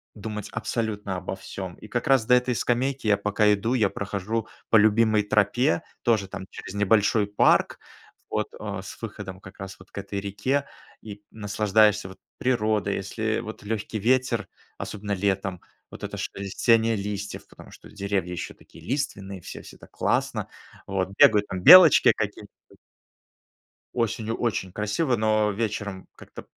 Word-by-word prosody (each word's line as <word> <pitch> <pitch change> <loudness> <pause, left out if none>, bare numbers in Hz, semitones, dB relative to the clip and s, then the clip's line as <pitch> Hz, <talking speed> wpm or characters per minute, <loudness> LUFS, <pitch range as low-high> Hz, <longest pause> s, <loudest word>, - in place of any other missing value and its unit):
думать 105 -1 -6
абсолютно 105 -4 -3
обо 90 +1 -5
всём. 95 -2 -7
И 110 - -13
как 120 +2 -3
раз 135 -4 +4
до 125 - +4
этой 125 0 +3
скамейки 125 +1 -1
я 105 - +5
пока 105 +1 +2
иду, 110 +5 -1
я 105 -6 +3
прохожу 100 +3 -3 0.2
по - - +3
любимой 110 0 +4
тропе, 110 +10 +2 0.2
тоже 110 -5 +1
там 95 - -7
через 95 - -9
небольшой 105 +1 +2
парк, 105 - +3 0.5
вот, 105 0 -1
а, 105 -2 -5
с 95 - -11
выходом 100 -4 -7
как 95 0 -14
раз 95 -1 -8
вот 95 - -17
к - - -14
этой 100 0 -4
реке, 130 +8 -1 0.4
и 105 -1 -10
наслаждаешься 105 -1 +2
вот 95 - -12 0.2
природой. 110 -5 0
Если 110 +3 -2
вот 110 -2 -8
легкий 110 0 -3
ветер, 130 +4 +1 0.3
особенно 105 0 -4
летом, 95 -2 -1 0.3
вот - - -11
это - - -5
шелестение 115 +3 +1
листьев, 100 0 -5
потому - - -15
что - - -15
деревья 100 -3 -2
еще 90 - -5
такие - - -17
лиственные 105 -8 -3
все, - - -9
всё - - -13
так - - -16
классно, - - -1 0.4
вот 95 -1 -1
бегают 105 -1 +6
там 95 -1 -5
белочки 180 -5 +9
какие-то. - - -4 1.5
Осенью 115 -1 -1
очень 105 -5 -2
красиво, 105 - 0
но 110 -1 +2
вечером 105 -2 -4
как-то - - -12
105 Hz, 155 wpm, -25 LUFS, 100-115 Hz, 1.5 s, белочки